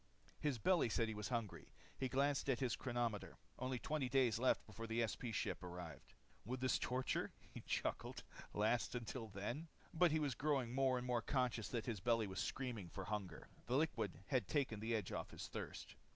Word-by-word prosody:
His 145 -4 +1
belly 170 - +4
said 115 0 +2
he - - -1
was 105 0 -3
hungry. 115 -5 -2 0.2
He 130 - -1
glanced 140 +2 +2
at 130 - +4
his 125 -4 +1
chronometer. 120 -4 -1 0.2
Only 130 0 0
20 140 0 -1
days 125 -4 +4
left 130 - +3
before 115 +1 -6
the 115 +1 +2
SP 110 +4 -3
ship 110 - -1
arrived. 85 -5 -7 0.3
Would 125 +4 -3
this 130 0 +3
torture 125 +1 0 0.2
he - - -7
chuckled - - -1 0.3
last 110 +4 +2
until 120 0 -3
then? 110 - -3 0.3
But 175 +1 +6
he 155 - +4
was 145 -4 +1
growing 135 -3 +1
more 130 -1 +4
and 125 - -3
more 125 -2 +2
conscious 125 -3 +1
that 115 -3 -2
his 115 -5 -1
belly 115 +2 +3
was 95 -1 -4
screaming 120 -9 -2
for 95 - -5
hunger. 100 -4 -3 0.2
The 125 +2 +3
liquid 115 - +1
had 130 -2 +2
taken 135 -8 +1
the 115 +2 +1
edge 105 -4 -1
off - - -3
his - - -6
thirst. - - -5
120 Hz, 195 wpm, -42 LUFS, 110-130 Hz, 0.3 s, But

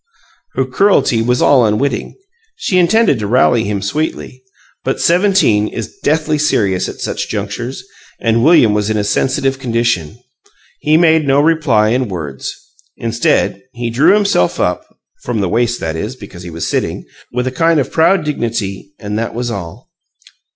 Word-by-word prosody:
Her 130 - +1
cruelty 130 - +2
was 125 +2 +1
all 135 -4 +5
unwitting; 120 +5 -1 0.4
she 200 - 0
intended 180 - +3
to 105 - -3
rally 120 0 +3
him 100 -1 -2
sweetly. 130 +1 -3 0.4
But - - -2
seventeen 175 - +3
is 110 0 -6
deathly 155 0 +1
serious 100 -10 +1
at - - -7
such - - -4
junctures, 110 +5 -4 0.4
and 115 0 +1
William 150 -10 +5
was 105 0 0
in 110 - 0
a 105 - 0
sensitive 135 +5 0
condition. 115 - -1 0.6
He 155 +1 +3
made 160 -3 +3
no 135 +1 +3
reply 145 -9 +2
in 125 +2 0
words. 75 -8 -5 0.5
Instead, 115 0 0
he 120 -1 -4
drew 155 - +4
himself 200 - +1
up - - -1 0.3
(from 120 -3 -3
the 100 - 0
waist, 120 +2 0
that 80 -1 -3
is, 105 +9 -4
because 100 -7 -11
he 90 - -8
was 85 0 -4
sitting) - - -2 0.3
with 125 +1 -2
a 130 - -1
kind 165 +3 +2
of 135 - -2
proud 170 +1 +3
dignity. 105 -8 -3
And 105 0 -4
that 115 0 -4
was 120 0 -2
all. 100 +3 -8
120 Hz, 165 wpm, -15 LUFS, 105-150 Hz, 0.6 s, all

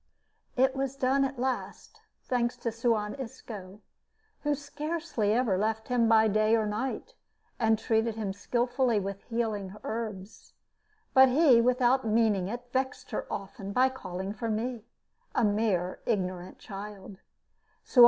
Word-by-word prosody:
It 265 +1 +3
was 270 0 -2
done 275 +1 +2
at 270 0 -2
last, 255 0 -4 0.2
thanks 245 -1 0
to 235 -1 -2
Suan 225 -2 0
Isco, 215 -6 -8 0.6
who 295 -1 +1
scarcely 295 -5 -2
ever 220 -5 +2
left 220 +2 -1
him 240 -2 +3
by 220 -1 +6
day 215 +1 +3
or 220 -1 +1
night, 215 +6 -3 0.5
and 220 -2 +3
treated 225 0 +1
him 210 -3 -3
skillfully 245 +2 +1
with 195 0 -4
healing 215 -5 -2
herbs. 215 -3 -6 0.6
But 265 0 +8
he, 260 -3 +6
without 250 +1 +3
meaning 215 -4 +2
it, 240 +4 -5
vexed 260 0 -2
her - - -3
often 200 0 -5
by 255 +4 +4
calling 190 -6 -5
for 230 +1 -4
me 225 +1 -2 0.5
a - - +3
mere 205 -4 +1
ignorant 185 -5 -2
child. 200 -1 -9
225 Hz, 135 wpm, -29 LUFS, 210-255 Hz, 0.6 s, But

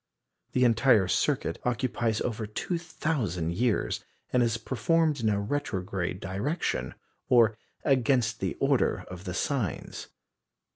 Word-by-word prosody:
The 125 - +3
entire 115 -4 +5
circuit 85 -2 0
occupies 120 -3 0
over 110 -2 -2
2,000 125 - -2
years, 115 +4 0 0.3
and 125 - +4
is 115 -1 +2
performed 155 +4 +1
in 110 -2 +1
a 100 -1 +1
retrograde 95 -6 -2
direction, 95 - -2 0.3
or 115 -4 +5 0.3
against 125 -4 +2
the 95 -2 -2
order - - +2
of 90 +1 -9
the 90 -1 -4
Signs. 125 - -2
115 Hz, 115 wpm, -28 LUFS, 95-130 Hz, 0.3 s, entire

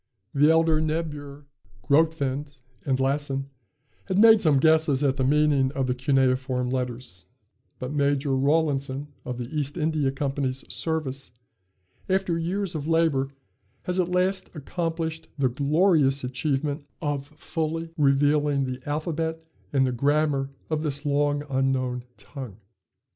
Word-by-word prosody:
The 145 +2 +5
elder 160 -1 +4
Niebuhr, 150 -3 -3 0.4
Grotefend, 145 -1 +1 0.3
and 130 -1 +1
Lassen, 135 0 -1 0.5
had 190 -1 -1
made 220 0 +7
some 155 -4 +4
guesses 155 -1 +4
at 135 -1 +2
the 130 - +1
meaning 145 -1 +3
of 135 -2 0
the 125 - 0
cuneiform 130 -1 +1
letters; 125 -8 -4 0.5
but 130 +3 -5
Major 140 -1 +1
Rawlinson 140 0 +1 0.2
of 125 -1 -4
the 125 +4 -6
East 145 +1 -2
India 155 -4 +1
Company's 135 -1 -2
service, 140 -6 -3 0.8
after 190 -2 +1
years 185 +3 -2
of 155 -2 -4
labor, 160 -5 +2 0.5
has 180 +1 -1
at 180 -1 +1
last 185 +2 0
accomplished 160 +1 -3
the 135 -2 +2
glorious 140 +1 +2
achievement 140 +3 -1 0.2
of 145 -3 -2
fully 165 0 -3
revealing 145 0 +3
the 130 0 -5
alphabet 160 +2 -2 0.3
and 135 -2 +3
the 130 - 0
grammar 140 +1 +1 0.2
of 155 -1 0
this 145 -1 -3
long 145 0 +1
unknown 130 -2 0
tongue. 130 -9 -9
145 Hz, 130 wpm, -25 LUFS, 135-160 Hz, 0.8 s, made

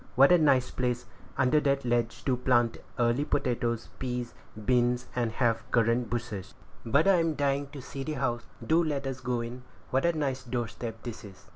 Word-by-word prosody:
What 135 +4 +7
a 180 - +8
nice 135 -5 +3
place, 125 -1 -1 0.3
under 130 +4 +4
that 140 -2 +1
ledge, 120 -1 0
to 130 - +2
plant 120 -2 +2 0.2
early 120 +3 +2
potatoes, 120 -5 -1
peas, 125 -2 -3 0.2
and 110 -1 -10
beans, 125 +1 +2
and 120 -2 0
have 115 -2 +1
currant 115 +1 +2
bushes! 110 -5 -4 0.3
But 140 +9 +3
I'm 165 -5 +4
dying 140 0 0
to 140 -2 -10
see 135 +1 -6
the 155 - -3
house; 120 -4 -2 0.2
do 165 +7 +4
let 145 -3 -2
us 135 -1 -3
go 125 -1 -1
in; 120 +2 -6 0.3
what 130 +3 +2
a 170 -2 +2
nice 135 -3 -1
doorstep 115 -2 -4
this 120 -2 -6
is!" 100 -3 -13
125 Hz, 185 wpm, -29 LUFS, 120-140 Hz, 0.3 s, a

